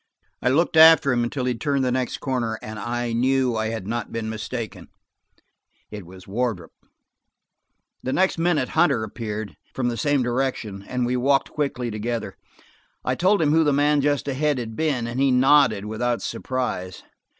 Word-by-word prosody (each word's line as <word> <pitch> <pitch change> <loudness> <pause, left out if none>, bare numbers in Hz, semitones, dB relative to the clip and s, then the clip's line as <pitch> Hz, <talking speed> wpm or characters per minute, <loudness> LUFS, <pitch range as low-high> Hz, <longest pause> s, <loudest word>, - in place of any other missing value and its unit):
I - - +2
looked 160 +4 +2
after 160 -3 +8
him 120 -1 +1
until 125 +2 -2
he 125 - +1
turned 140 +2 -1
the 125 - +1
next 130 0 -1
corner, 120 -4 -2
and 110 0 -7
I 120 +1 -3
knew 130 +1 +1
I 110 0 -1
had 110 -3 -4
not 115 +1 -4
been 110 -1 -3
mistaken; 110 +1 -6 1.0
it 105 -5 -8
was 95 +1 -13
Wardrop. 110 -4 -2 1.3
The 130 - -3
next 185 +2 +1
minute 165 -6 +1
Hunter 160 -9 +2
appeared, 110 -1 -5 0.2
from 125 -2 0
the 120 - -4
same 145 -1 +1
direction, 120 -5 -2
and 125 -1 -1
we 125 +1 0
walked 135 +2 +2
quickly 130 -5 -2
together. 115 +2 -4 0.7
I 125 - +1
told 185 +6 +2
him 145 - +2
who 160 +1 +4
the 145 -2 +2
man 145 +1 +3
just 145 0 0
ahead 145 +1 0
had 115 -2 -5
been, 140 -6 0
and 120 +2 -4
he 135 0 +3
nodded 130 -5 +4
without 115 +3 -2
surprise. 125 -8 -4
125 Hz, 170 wpm, -23 LUFS, 115-140 Hz, 1.3 s, after